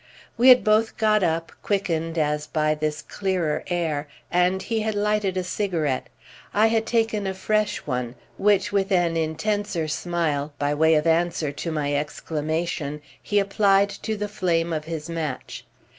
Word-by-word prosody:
We 245 Hz, +3 st, +6 dB
had 250 Hz, -1 st, +8 dB
both 215 Hz, +1 st, +2 dB
got 215 Hz, -1 st, +3 dB
up, 165 Hz, -2 st, 0 dB
quickened 165 Hz, -5 st, -1 dB
as 150 Hz, -1 st, 0 dB
by 155 Hz, -1 st, +1 dB
this 155 Hz, 0 st, -3 dB
clearer 185 Hz, -6 st, -1 dB
air, 160 Hz, -4 st, -1 dB, 0.2 s
and 180 Hz, +1 st, +2 dB
he 225 Hz, -1 st, -1 dB
had 215 Hz, 0 st, -1 dB
lighted 205 Hz, -2 st, 0 dB
a 185 Hz, -, 0 dB
cigarette. 170 Hz, -8 st, -1 dB, 0.5 s
I 210 Hz, +2 st, +5 dB
had 225 Hz, 0 st, +1 dB
taken 225 Hz, -4 st, +1 dB
a 190 Hz, -, -3 dB
fresh 215 Hz, +2 st, 0 dB
one, 125 Hz, -3 st, -3 dB, 0.2 s
which 200 Hz, -1 st, +3 dB
with 200 Hz, 0 st, 0 dB
an 175 Hz, -3 st, +2 dB
intenser 165 Hz, +2 st, -1 dB
smile, 155 Hz, -3 st, -1 dB
by 145 Hz, 0 st, 0 dB
way 160 Hz, +2 st, +4 dB
of 150 Hz, +1 st, +2 dB
answer 165 Hz, -2 st, +1 dB
to 165 Hz, +4 st, -4 dB
my 145 Hz, -2 st, -1 dB
exclamation, 150 Hz, +1 st, -2 dB, 0.2 s
he 205 Hz, -, -1 dB
applied 200 Hz, 0 st, +3 dB
to 220 Hz, +1 st, -4 dB
the 210 Hz, 0 st, -2 dB
flame 170 Hz, -5 st, 0 dB
of 155 Hz, -1 st, -3 dB
his 160 Hz, -1 st, -5 dB
match. 160 Hz, -5 st, -5 dB
170 Hz, 160 wpm, -24 LUFS, 155-205 Hz, 0.5 s, had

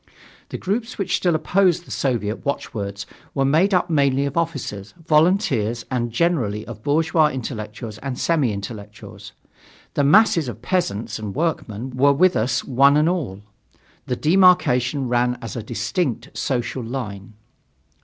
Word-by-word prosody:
The -, -, -5 dB
groups 225 Hz, +5 st, -3 dB
which 195 Hz, -, 0 dB
still 175 Hz, -3 st, +1 dB
opposed 175 Hz, +2 st, +2 dB
the -, -, -13 dB
Soviet 115 Hz, -5 st, -1 dB
watch 140 Hz, -1 st, -3 dB
words 100 Hz, -2 st, -5 dB, 0.3 s
were 135 Hz, -, +2 dB
made 160 Hz, +9 st, +3 dB
up 180 Hz, -2 st, +2 dB
mainly 140 Hz, -4 st, +2 dB
of 140 Hz, -, -4 dB
officers, 140 Hz, -, -3 dB
volunteers 150 Hz, -, +2 dB
and 120 Hz, -2 st, -1 dB
generally 120 Hz, -8 st, 0 dB
of 110 Hz, -2 st, -9 dB
bourgeois 155 Hz, +3 st, +2 dB
intellectuals 110 Hz, -4 st, -6 dB
and 130 Hz, +1 st, -5 dB
semi 150 Hz, -8 st, +1 dB
intellectuals. 105 Hz, 0 st, -8 dB, 0.6 s
The 145 Hz, -, +1 dB
masses 165 Hz, -, +4 dB
of 115 Hz, -1 st, -7 dB
peasants 120 Hz, -, -1 dB
and 105 Hz, -2 st, -6 dB
workmen 130 Hz, -7 st, -2 dB
were 140 Hz, +3 st, +3 dB
with 180 Hz, +6 st, +3 dB
us 115 Hz, +2 st, 0 dB
one 140 Hz, +2 st, +4 dB
and 150 Hz, +1 st, +3 dB
all. 130 Hz, -, -2 dB, 0.6 s
The 125 Hz, -, -1 dB
demarcation 150 Hz, -6 st, +3 dB
ran 125 Hz, 0 st, +1 dB
as 115 Hz, -4 st, -7 dB
a 120 Hz, -, -3 dB
distinct 120 Hz, -, -3 dB
social 125 Hz, 0 st, -2 dB
line. 110 Hz, -4 st, -6 dB
130 Hz, 145 wpm, -22 LUFS, 115-160 Hz, 0.6 s, masses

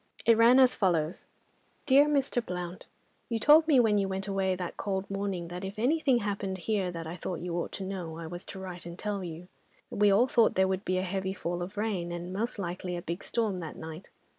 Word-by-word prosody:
It 230 Hz, -, +6 dB
ran 235 Hz, +3 st, +6 dB
as 255 Hz, -1 st, +6 dB
follows:— 170 Hz, -4 st, 0 dB, 0.6 s
"DEAR 285 Hz, +1 st, +6 dB
MR. 275 Hz, -4 st, +1 dB
BLOUNT,—You 180 Hz, +5 st, -7 dB
told 300 Hz, +7 st, +6 dB
me 285 Hz, -5 st, +5 dB
when 215 Hz, -3 st, +4 dB
you 195 Hz, -, 0 dB
went 190 Hz, +1 st, -3 dB
away 195 Hz, -1 st, 0 dB
that 180 Hz, -1 st, -5 dB
cold 195 Hz, -1 st, -2 dB
morning, 195 Hz, -4 st, -3 dB
that 180 Hz, +2 st, -6 dB
if 195 Hz, +2 st, -6 dB
anything 270 Hz, +2 st, +3 dB
happened 200 Hz, -2 st, -2 dB
here 195 Hz, -1 st, -1 dB
that 165 Hz, -2 st, -6 dB
I 160 Hz, +2 st, -5 dB
thought 180 Hz, -1 st, -5 dB
you 175 Hz, -1 st, -3 dB
ought -, -, -4 dB
to 195 Hz, -, -5 dB
know, 180 Hz, -4 st, -5 dB
I 165 Hz, -, -6 dB
was 175 Hz, +2 st, -7 dB
to 195 Hz, -, -8 dB
write 180 Hz, -2 st, -7 dB
and 170 Hz, 0 st, -8 dB
tell 205 Hz, -2 st, -3 dB
you. 170 Hz, 0 st, -7 dB, 0.4 s
We 205 Hz, 0 st, +3 dB
all 210 Hz, +5 st, +5 dB
thought 235 Hz, -3 st, +3 dB
there 190 Hz, 0 st, +4 dB
would 190 Hz, +1 st, -2 dB
be 185 Hz, -, 0 dB
a 185 Hz, -, 0 dB
heavy 190 Hz, 0 st, -2 dB
fall 175 Hz, -1 st, -3 dB
of 190 Hz, +4 st, -6 dB
rain, 200 Hz, -5 st, -1 dB
and 175 Hz, +1 st, -5 dB
most 225 Hz, +5 st, -2 dB
likely 180 Hz, -1 st, -4 dB
a -, -, -5 dB
big 170 Hz, +3 st, -4 dB
storm 215 Hz, -6 st, -1 dB
that 160 Hz, -3 st, -6 dB
night. 160 Hz, +3 st, -9 dB
190 Hz, 225 wpm, -29 LUFS, 175-215 Hz, 0.6 s, It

